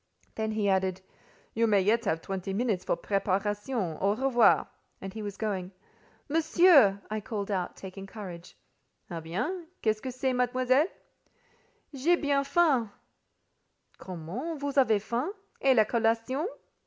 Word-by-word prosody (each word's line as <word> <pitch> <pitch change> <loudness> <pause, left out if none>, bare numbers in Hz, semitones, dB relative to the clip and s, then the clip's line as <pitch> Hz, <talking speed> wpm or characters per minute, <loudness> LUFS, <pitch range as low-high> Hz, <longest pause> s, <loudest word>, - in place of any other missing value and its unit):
Then 220 0 -2
he 215 -2 0
added, 190 -1 +1 0.5
"You 230 +1 +2
may 205 -2 +4
yet 225 +5 +2
have 160 0 -1
twenty 195 0 -4
minutes 210 -4 0
for - - 0
preparation: 200 0 -1
au 200 +2 +2
revoir!" 250 -1 +4 0.3
And 195 -1 -7
he 220 - -6
was 205 -2 -6
going. 195 -4 -3 0.5
"Monsieur," 315 - +5
I 215 0 -2
called 210 -2 -4
out, 185 -3 -2
taking 195 0 -9
courage. 185 -5 -9 0.5
"Eh 170 - -3
bien! 300 - -3 0.2
Qu'est 215 - +4
ce - - -19
que 260 - -4
c'est, 255 +1 -1
Mademoiselle?" 255 +4 +2 1.1
"J'ai 295 +6 +3
bien 285 -4 +1
faim." 280 -7 +2 1.1
"Comment, 190 - -5
vous 285 0 -3
avez 225 -5 +4
faim! 245 - -2 0.3
Et 270 -1 +5
la 220 -2 +5
collation?" 230 - 0
220 Hz, 140 wpm, -29 LUFS, 195-265 Hz, 1.1 s, Monsieur